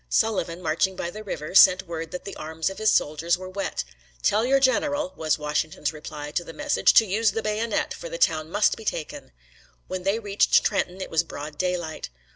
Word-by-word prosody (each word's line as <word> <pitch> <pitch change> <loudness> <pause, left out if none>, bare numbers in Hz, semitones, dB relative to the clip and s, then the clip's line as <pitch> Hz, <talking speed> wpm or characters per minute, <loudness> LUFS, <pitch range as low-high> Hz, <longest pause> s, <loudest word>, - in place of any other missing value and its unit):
Sullivan, 180 - 0
marching 185 +4 +1
by 175 -1 -4
the 215 +2 -8
river, 155 -5 -5
sent 190 0 +7
word 165 -1 -5
that 180 +2 -7
the 200 - -7
arms 160 +3 -3
of 195 - -9
his 215 0 +3
soldiers 160 +4 +1
were 185 0 -8
wet. 195 - -3 0.4
"Tell 215 +2 +3
your 270 +3 +3
general," 280 +2 +1
was 155 -1 0
Washington's 150 0 -2
reply 150 -1 -7
to 175 - -1
the - - -10
message, 300 0 +3
"to 225 - +8
use 210 +1 +1
the 225 - -2
bayonet, 215 +1 -1
for - - -8
the - - -5
town 155 - +1
must 205 +4 +2
be 220 - -11
taken." 160 - -4 0.5
When 185 - -4
they 195 +4 +1
reached 205 -3 +3
Trenton 190 -2 -1
it - - -6
was 160 - +3
broad 150 -2 -8
daylight. 180 - -2
185 Hz, 205 wpm, -25 LUFS, 160-215 Hz, 0.5 s, to